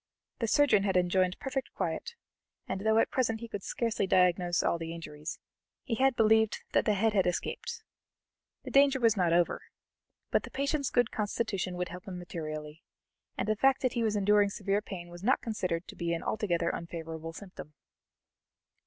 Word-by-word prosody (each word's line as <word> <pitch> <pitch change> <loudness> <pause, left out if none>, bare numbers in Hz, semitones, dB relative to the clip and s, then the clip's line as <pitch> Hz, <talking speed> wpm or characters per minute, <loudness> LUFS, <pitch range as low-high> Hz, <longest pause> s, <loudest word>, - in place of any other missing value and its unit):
The 230 - 0
surgeon 250 -4 +4
had 195 -2 +1
enjoined 180 +1 +2
perfect 270 -1 -4
quiet, 470 0 -3 0.5
and 190 0 -3
though 220 +1 +3
at 225 - +3
present 225 -4 0
he 235 - -7
could 205 -3 -5
scarcely 225 -1 -1
diagnose 180 -1 +3
all 170 - +1
the 165 0 -5
injuries, 155 -1 -7 0.5
he 230 - -2
believed 220 -3 +3
that - - +2
the 210 - +3
head 220 +2 +2
had 190 -3 +3
escaped. 450 - -3 0.8
The - - -7
danger 275 -1 +5
was 230 -3 +4
not 180 -4 +2
over, 170 0 +2 0.7
but - - +3
the - - -9
patient's 280 0 -1
good 245 -1 +2
constitution 205 -4 -2
would 180 0 -3
help 180 +2 -9
him 185 -2 -5
materially, 155 -3 -6 0.6
and 195 - -1
the 215 - +2
fact 270 +5 +3
that 255 - +1
he 235 - -1
was 220 -2 +1
enduring 205 0 +4
severe 200 +1 -1
pain 180 -5 -8
was 175 0 -10
not 250 +7 +3
considered 185 -6 -3
to - - -10
be 170 -1 -1
an 165 - -5
altogether 175 -6 0
unfavorable 165 -1 -6
symptom. 180 -6 -10
195 Hz, 180 wpm, -30 LUFS, 175-225 Hz, 0.8 s, danger